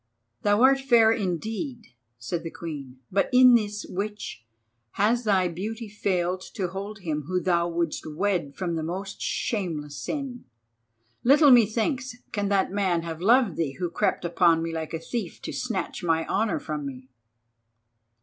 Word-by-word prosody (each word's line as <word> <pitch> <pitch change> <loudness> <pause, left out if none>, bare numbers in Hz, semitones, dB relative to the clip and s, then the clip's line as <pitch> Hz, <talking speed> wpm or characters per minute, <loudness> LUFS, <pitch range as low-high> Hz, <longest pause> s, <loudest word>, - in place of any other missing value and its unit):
"Thou 205 +3 +3
art 270 +1 +6
fair 235 -5 +5
indeed," 220 - -3 0.2
said 140 +9 -3
the 165 - -5
Queen, 145 -7 -7
"but 195 +1 +2
in 250 -1 +8
this, 210 -3 +1
witch, 200 - -5 0.5
has 230 +4 +2
thy 190 -3 +3
beauty 215 +7 -5
failed 185 -3 -1
to 185 -4 -1
hold 200 +3 -6
him 150 -4 -3
whom 180 0 -1
thou 170 -2 +2
wouldst 170 -2 -2
wed 175 -6 0
from 180 -3 -2
the 165 - -1
most 190 +5 -5
shameless 160 -9 -2
sin. 275 - -5 0.8
Little 285 +3 +6
methinks 245 +3 +3 0.2
can 205 -2 -1
that 195 -2 +2
man 190 -4 +1
have 165 -1 -6
loved 230 -1 +4
thee 155 -5 -1
who 170 +5 -3
crept 170 - 0
upon 170 -1 +3
me 165 0 -3
like 160 0 -4
a - - -3
thief 235 +7 -5
to - - -5
snatch - - -3
my 165 -1 +1
honour 210 -2 0
from 150 -1 -4
me." 130 -2 -7
190 Hz, 160 wpm, -26 LUFS, 165-220 Hz, 0.8 s, in